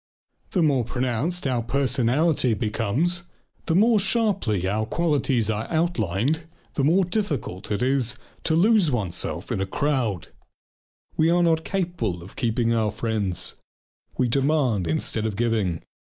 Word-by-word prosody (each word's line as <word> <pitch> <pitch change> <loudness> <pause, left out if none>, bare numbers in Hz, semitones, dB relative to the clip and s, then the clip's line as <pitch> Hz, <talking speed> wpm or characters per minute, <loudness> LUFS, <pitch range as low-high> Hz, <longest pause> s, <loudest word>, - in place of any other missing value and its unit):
The 180 - +3
more 140 -5 +3
pronounced 130 +9 -2
our 130 -3 +1
individuality 130 +2 +1
becomes, 125 - -1 0.4
the 165 - +2
more 220 +3 +5
sharply 195 - +1
our 110 +3 -1
qualities 140 -9 +1
are 110 +1 -3
outlined, 155 - 0 0.3
the 140 - -1
more 175 +6 +4
difficult 150 - -3
is 125 +3 +1
it - - -18 0.3
to 160 - +2
lose 200 0 +4
oneself 105 -10 -2
in - - -1
a 95 - -1
crowd. 120 - -1 0.9
We 160 +1 +4
are 175 +1 +3
not 160 -1 +2
capable 165 - -2
of 95 - -13
keeping 115 -2 0
our 110 -2 +1
friends. 105 -4 -1 0.6
We 125 - +2
demand 130 - +1
instead 105 +7 0
of 105 - -4
giving. 105 -7 0
125 Hz, 135 wpm, -24 LUFS, 110-165 Hz, 0.9 s, more